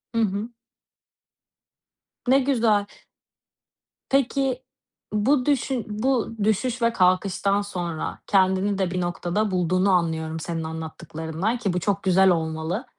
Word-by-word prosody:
Hı 230 - +3
hı. 205 +2 -1 1.8
Ne 265 +2 +5
güzel 230 -6 +2 1.2
Peki, 270 -1 +1 0.5
bu 250 +5 +2
düşün 270 -4 0
bu 230 +1 -1
düşüş 235 +4 0
ve 230 0 +2
kalkıştan 195 +2 +2
sonra 175 -5 -4
kendini 190 0 +2
de 190 -2 0
bir 180 0 -1
noktada 175 +4 -1
bulduğunu 185 +2 +2
anlıyorum 160 -2 0
senin 165 +1 -4
anlattıklarından 160 +5 -4
ki 200 -6 -1
bu 180 - 0
çok 200 +2 -1
güzel 190 0 +5
olmalı. 160 - -1
195 Hz, 115 wpm, -24 LUFS, 175-230 Hz, 1.8 s, Ne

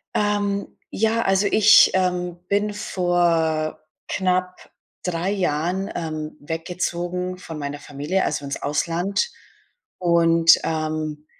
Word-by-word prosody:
Ähm, 205 -1 0 0.2
ja, 225 +2 +1
also 195 +1 +2
ich, 215 +1 +7
ähm, 180 -2 0
bin 205 +1 0
vor 170 -5 0 0.3
knapp 185 -1 -1 0.3
3 180 +1 -1
Jahren, 185 +1 -1
ähm, 155 -2 -5
weggezogen 175 +3 -3
von 165 -4 -8
meiner 145 0 -5
Familie, 145 +7 -2
also 145 -1 -2
ins 140 - -5
Ausland. 170 - 0 0.7
Und, 165 -2 +5
ähm, 155 -1 -3
175 Hz, 105 wpm, -22 LUFS, 155-190 Hz, 0.7 s, ich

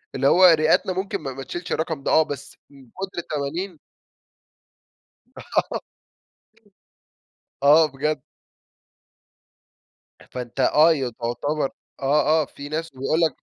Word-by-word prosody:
اللي 135 +1 +2
هو 185 +4 +6
رئتنا 165 +2 +4
ممكن 195 0 -3
ما 135 -3 -5
ما 135 +1 -7
تشيلش 175 +4 -7
الرقم 160 -3 -2
ده - - 0
آه، 160 - +6
بس 140 -2 -8
من 135 -2 -17
كتر 190 -1 -7
التمارين 160 +3 -4 1.6
آه. - - -2 1.8
آه، 150 +1 +6
بجد. 150 0 -2 2.1
فأنت 125 +1 -6
آه، 155 +5 +5
ي 135 -5 -2
تعتبر 125 +6 -2 0.3
آه، 150 +3 +3
آه، - - -2
في 140 +1 -10
ناس 160 +2 -3
بيقول 135 +5 -1
لك 160 -4 +1
150 Hz, 120 wpm, -23 LUFS, 135-165 Hz, 2.1 s, هو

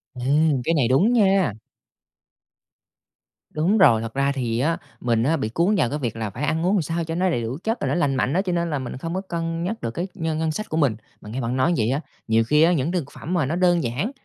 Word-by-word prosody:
Ê, 125 - -7 0.4
cái 165 +6 +1
này 130 -6 +2
đúng 180 - +3
nha! 195 - +3 2.0
Đúng 170 +8 +2
rồi, 120 - +5
thật 115 0 -6
ra 140 +1 +1
thì 120 -4 -2
á 165 +6 +1 0.2
mình 115 -2 +1
á 160 +6 +2
bị 110 - -2
cuốn 170 - +1
vào 120 -12 +2
cái 150 - -3
việc 120 -6 -3
là 110 -2 -3
phải 120 +9 -6
ăn 160 +3 0
uống 190 +3 +3
làm 195 - +2
sao 165 +2 -2
cho 165 0 -4
nó 185 +2 +1
đầy 140 -9 0
đủ 115 +4 -4
chất 225 +2 -1
rồi - - 0
nó - - 0
lành 145 -6 +1
mạnh 130 +1 0
á, 185 - +2
cho 190 -2 -3
nên 170 0 0
là 145 -3 -1
mình 130 -1 -6
không 165 +5 -5
có 190 - -1
cân 165 -3 -3
nhắc 215 +6 -3
được 115 - -3
cái 175 +9 -3
nhân 160 -1 -2
ngân 160 -1 0
sách 215 +7 -5
của 155 - -2
mình. 140 -8 +2 0.3
Mà 105 - -11
nghe 125 +5 -4
bạn 120 +2 -2
nói 130 +7 +2
như - - +1
vậy 110 - 0
á, 140 +3 -1 0.3
nhiều 115 0 +3
khi 150 +6 +3
á, 170 +2 +4
những 155 0 0
thực 175 -5 -1
phẩm 170 - -6
mà 170 -6 +2
nó 155 +6 -2
đơn 175 -2 +3
giản, 130 - -2
155 Hz, 280 wpm, -23 LUFS, 125-175 Hz, 2.0 s, rồi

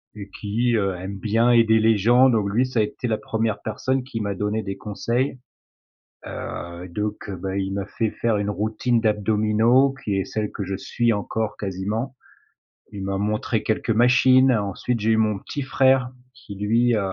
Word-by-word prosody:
et 100 -1 -9
qui, 115 +4 0
heu, 100 -4 0
aime 95 +2 -6
bien 115 +4 +2
aider 115 -2 +5
les 110 -1 +4
gens, 120 +6 +5
donc 105 -5 +1
lui, 120 +6 +2
ça 125 -2 -2
a 110 - +4
été 120 +3 -4
la 110 - 0
1re 110 -1 -2
personne 130 0 -2
qui 125 -3 -6
m'a 100 -1 -2
donné 105 +2 -2
des 100 -1 -4
conseils. 120 +7 -2 0.9
Heu, 85 +1 -6
donc 105 +4 -4
beh, 95 0 -3
il 95 - -4
m'a 100 0 -3
fait 110 +1 -2
faire 115 -3 -1
une 100 0 -1
routine 110 +4 0
d'abdominaux 110 +5 +2
qui 100 - -1
est 95 - -1
celle 105 -1 -3
que 100 - -5
je 95 +1 -3
suis 115 +4 0
encore 110 +1 -3
quasiment. 105 +7 -3 0.8
Il 100 - -6
m'a 95 0 -2
montré 105 +2 -1
quelques 110 +1 -2
machines, 130 +3 +5
ensuite 110 +3 -1
j'ai 110 +2 +1
eu 110 - +3
mon 105 -2 +1
petit 145 +8 -5
frère 130 -1 +2 0.2
qui 120 -6 -11
lui, 115 +4 +2
heu, - - +1
110 Hz, 185 wpm, -23 LUFS, 100-120 Hz, 0.9 s, aider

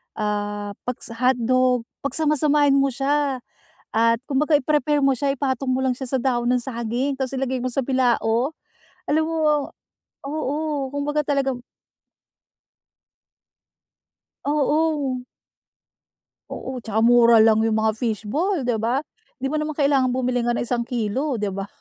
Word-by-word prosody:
ah, 205 -1 -2 0.2
pagsa 250 -2 -5
hotdog. 255 0 +2 0.2
Pagsama-samahin 295 -1 +2
mo 275 - +3
siya 275 0 0 0.6
at 230 +1 +3
kumbaga 295 +3 +1
i-prepare 295 +1 +1
mo 275 -1 +3
siya, 275 +2 0
ipatong 265 -1 -1
mo 255 - 0
lang 260 -2 0
siya 265 - -5
sa 255 - -1
dahon 240 -2 0
ng 250 - +2
saging 240 +3 -2
tas 265 -1 -3
ilagay 260 -1 -2
mo 255 - -1
sa 275 - +1
bilao. 250 0 +1 0.6
Alam 315 +2 +2
mo 330 - -3 0.9
oo, 295 -1 -2
kumbaga 295 +1 -1
talaga 275 -3 0 2.9
Oo. 295 -3 +1 1.3
Oo, 255 -2 -6
'tsaka 220 -1 -1
mura 235 0 +6
lang 220 0 +5
yung 220 -1 +1
mga 220 0 +1
fishball, 250 - -1
'di 240 - +2
ba? 240 +4 +1 0.4
Hindi 265 - -1
mo - - -1
naman 305 0 -3
kailangang 275 -3 +3
bumili 255 -1 0
nga 240 - +1
ng - - -1
isang 240 0 -1
kilo, 245 +2 -1
'di 205 -1 -1
ba. 195 0 -4
260 Hz, 140 wpm, -23 LUFS, 235-285 Hz, 2.9 s, mura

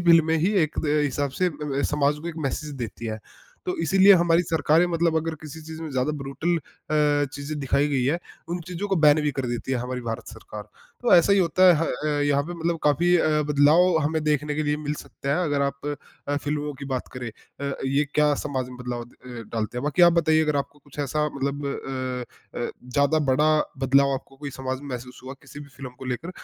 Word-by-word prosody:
फिल्में 165 -2 +5
में 160 - +3
ही 195 - +3
एक 155 - -2
द 150 0 +2
हिसाब 145 0 -1
से 185 - +4
ब - - -12
ब 140 -1 -1
समाज 145 0 +2
को 170 - -4
एक 170 - -6
मैसेज़ 150 +2 -5
देती 115 -2 -6
हैं। 110 0 -3 0.5
तो 365 0 -1
इसीलिए 195 +1 +6
हमारी 170 0 +4
सरकारें 160 0 +3
मतलब 170 -1 +1
अगर 160 0 -1
किसी 155 +1 -9
चीज़ 160 +1 -8
में 160 - -5
ज़्यादा 130 +2 0
ब्रुटल 140 +6 -1
अ, 150 -2 0
चीज़ें 145 +1 -5
दिखाई 140 +2 +1
गई 135 -3 +1
है, 150 +6 +1 0.3
उन 175 +1 -3
चीज़ों 185 +3 -4
को 195 - +1
बैन 155 -1 +5
भी 150 - +1
कर 135 -2 -3
देती 120 +2 -3
है 130 - +1
हमारी 125 +1 -4
भारत 115 0 -5
सरकार। 105 -1 -10 0.3
तो 245 - +5
ऐसा 175 +3 +6
ही 200 - +4
होता 180 +1 +3
है 175 - +8
ह 160 - +1 0.4
अ, - - +2
यहाँ 145 -1 +2
पे 175 +4 -6
मतलब 170 0 -1
काफ़ी 170 +4 +3
अ, 155 -2 +2
बदलाव 155 +5 +5
हमें 155 +2 0
देखने 150 0 0
के 155 - -1
लिए 150 0 0
मिल 150 0 -3
सकता 140 - -8
है, 180 - +1
अगर 145 -2 0
आप 140 +1 -3 0.4
अ, 145 - +1
फिल्मों 145 0 -2
की 140 - -7
बात 125 - -4
करें, 125 -2 -5 0.3
अ, 140 -1 -2
ये 140 +2 +2
क्या 150 -1 +4
समाज 130 -3 -2
में 125 - -10
बदलाव 125 -1 -4
अ, 120 - -12 0.4
डालते 115 +2 -2
हैं। - - -4
बाकी 150 +4 +2
आप 175 - +8
बताइए 160 -2 +3
अगर 150 -2 +1
आपको 140 +1 -3
कुछ 145 0 -18
ऐसा 150 +1 0
मतलब 140 +1 -2
अ 130 -3 -5
अ, 120 - -2 0.2
ज़्यादा 140 +3 +3
बड़ा 150 +4 +3 0.4
बदलाव 140 +1 +4
आपको 135 0 -8
कोई 140 0 -6
समाज 130 0 -4
में 145 - -9
महसूस 125 0 -7
हुआ 130 +1 -7
किसी 145 - -11
भी 145 - -11
फिल्म 130 -2 -7
को - - -9
लेकर, 130 +8 -4
145 Hz, 230 wpm, -25 LUFS, 135-160 Hz, 0.5 s, है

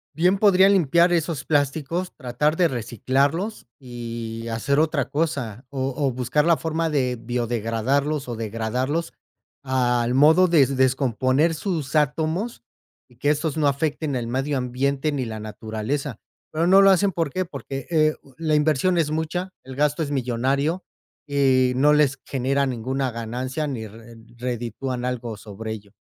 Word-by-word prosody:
Bien 180 +5 +3
podría 195 -2 +6
limpiar 175 -2 +4
esos 165 -4 -1
plásticos, 155 +4 0
tratar 150 +4 0
de 180 - +4
reciclarlos 135 - -1
y 115 -2 -6
hacer 115 +6 0
otra 155 -4 0
cosa 140 -7 -2
o 135 -1 -2
o 140 -3 +1
buscar 125 +4 0
la 170 -1 +4
forma 165 0 -1
de 130 -4 0
biodegradarlos 120 +4 -1
o 120 - -3
degradarlos 115 +8 -2 0.5
al 125 -2 +1
modo 160 +7 +6
des 140 -5 +3
descomponer 130 +4 +2
sus 160 -5 -3
átomos 160 - 0 0.5
y 125 - -23
que 145 +4 +1
estos 150 0 0
no 150 -2 +3
afecten 145 0 -1
el 120 - -2
medio 135 +4 -1
ambiente 135 +4 -1
ni 135 -3 -1
la 110 -1 -6
naturaleza. 110 +5 -4 0.3
Pero 165 +2 0
no 190 +2 +7
lo 195 - +7
hacen, 195 +1 +3
¿por 165 -4 -1
qué?, 185 +4 -1
porque, 135 -6 -7
eh, 155 -2 +3
u 135 - -20
la 155 -2 0
inversión 155 +4 +2
es 155 -2 +1
mucha. 160 +4 -2
El 130 0 -10
gasto 150 +3 +1
es 145 - -3
millonario 135 +6 0 0.4
y 130 -3 +3
no 145 +3 +5
les 145 -2 +3
genera 135 +1 0
ninguna 130 +2 -2
ganancia 125 +6 -3
ni 115 -6 -4
re 115 +2 -13 0.2
reditúan 125 +1 -4
algo 120 -3 -3
sobre 110 +1 -7
ello. 100 -2 -9
135 Hz, 155 wpm, -23 LUFS, 120-155 Hz, 0.5 s, no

